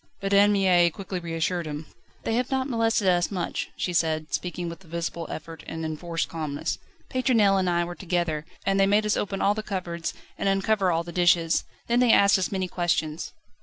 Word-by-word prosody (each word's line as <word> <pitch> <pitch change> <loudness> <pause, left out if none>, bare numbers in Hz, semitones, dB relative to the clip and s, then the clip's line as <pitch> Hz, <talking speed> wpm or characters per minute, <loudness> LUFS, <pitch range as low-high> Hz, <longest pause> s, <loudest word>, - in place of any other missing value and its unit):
But 195 0 -2
Anne 200 +1 +6
Mie 185 -4 +4
quickly 185 +2 -5
reassured 170 0 -2
him. 150 +1 -5 0.4
"They 225 - -1
have 250 +2 0
not 265 0 0
molested 230 -5 +1
us 175 -1 +3
much," 180 -4 -3
she 180 - -2
said, 155 -2 0
speaking 175 -1 -2
with 170 +3 -8
a - - -19
visible 170 0 -4
effort 165 +1 -7
and 160 0 -4
enforced 165 +2 -2
calmness. 155 -3 -3 0.3
"Pétronelle 225 -7 +3
and 185 -1 +1
I 175 0 +2
were 175 - -6
together, 175 -4 -1 0.2
and 195 0 +2
they 195 - +5
made 210 +2 +3
us 210 - +2
open 195 -1 -2
all 200 - +4
the 215 - -3
cupboards 180 -5 -4 0.2
and 195 - +1
uncover 195 -1 +2
all 165 0 +1
the 170 - -8
dishes. 175 -1 +3 0.2
They 235 - +1
then 250 -1 +4
asked 200 -2 +6
us 185 - -1
many 190 -2 -1
questions." 165 -3 -1
180 Hz, 205 wpm, -26 LUFS, 165-200 Hz, 0.4 s, Anne